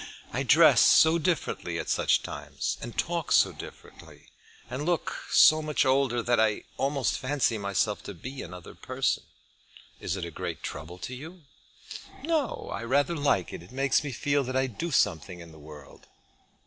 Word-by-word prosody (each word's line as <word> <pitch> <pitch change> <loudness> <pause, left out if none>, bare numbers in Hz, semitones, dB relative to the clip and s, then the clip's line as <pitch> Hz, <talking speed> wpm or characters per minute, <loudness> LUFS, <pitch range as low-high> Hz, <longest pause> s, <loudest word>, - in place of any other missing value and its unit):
I - - -1
dress - - +6
so 160 +1 +6
differently 170 +1 -2
at - - -4
such - - +2
times, - - -4
and 120 0 -8
talk 170 -2 -2
so - - +5
differently, - - -13 0.4
and 135 +3 -5
look 175 +1 -1
so 155 0 +6
much 150 -1 0
older, 130 -3 +2
that 120 0 +2
I 110 -1 +2
almost 140 -1 0
fancy 130 -4 0
myself 100 +1 -1
to 100 - -7
be 130 +10 -8
another 90 0 -10
person." - - -1 0.8
"Is 85 - -3
it 90 - -4
a 85 - -7
great - - -6
trouble 80 +4 -7
to 95 +8 -7
you?" 160 +7 -10 0.8
"No, 310 -6 -1
I 100 - -4
rather 140 +7 +1
like 140 - 0
it. - - -7
It 90 - -15
makes 135 +2 +1
me 145 - -4
feel 140 +3 0
that 130 +1 -4
I 130 0 +2
do 130 +7 -4
something 90 - 0
in 85 -1 -11
the 80 - -15
world." 75 -2 -14
130 Hz, 175 wpm, -27 LUFS, 100-145 Hz, 0.8 s, dress